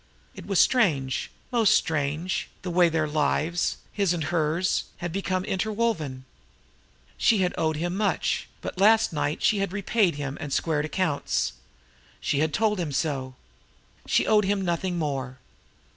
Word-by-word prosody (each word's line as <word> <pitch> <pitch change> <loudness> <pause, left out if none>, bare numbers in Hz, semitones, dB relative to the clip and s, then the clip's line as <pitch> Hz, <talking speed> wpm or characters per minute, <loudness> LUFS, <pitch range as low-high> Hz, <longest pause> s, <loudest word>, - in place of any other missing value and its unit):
It - - -11
was 195 -3 +2
strange, 145 - +2 0.2
most 230 -4 +4
strange, 155 +2 -1 0.2
the 180 - -3
way 175 0 +4
their 160 -1 0
lives, 155 +3 0 0.2
his 200 -4 +1
and 165 - -2
hers, 160 +3 0
had 175 -1 -4
become 185 -1 -1
interwoven! 190 - -1 0.9
She 210 -5 +3
had 180 - 0
owed 160 -1 0
him 175 +4 -2
much; 205 0 0
but - - -6
last 220 0 +5
night 145 0 -2
she 210 - +3
had 195 -2 -1
repaid 200 -2 +1
him 140 -1 -5
and 145 - -5
squared 150 0 0
accounts. 155 - -1 0.7
She 140 - 0
had 155 +1 +1
told 210 +1 +1
him 165 -4 -2
so. 135 -3 -2 0.7
She - - +3
owed 210 -2 +4
him 195 0 0
nothing 175 +1 -1
more. 135 -5 -3
170 Hz, 150 wpm, -26 LUFS, 150-195 Hz, 0.9 s, last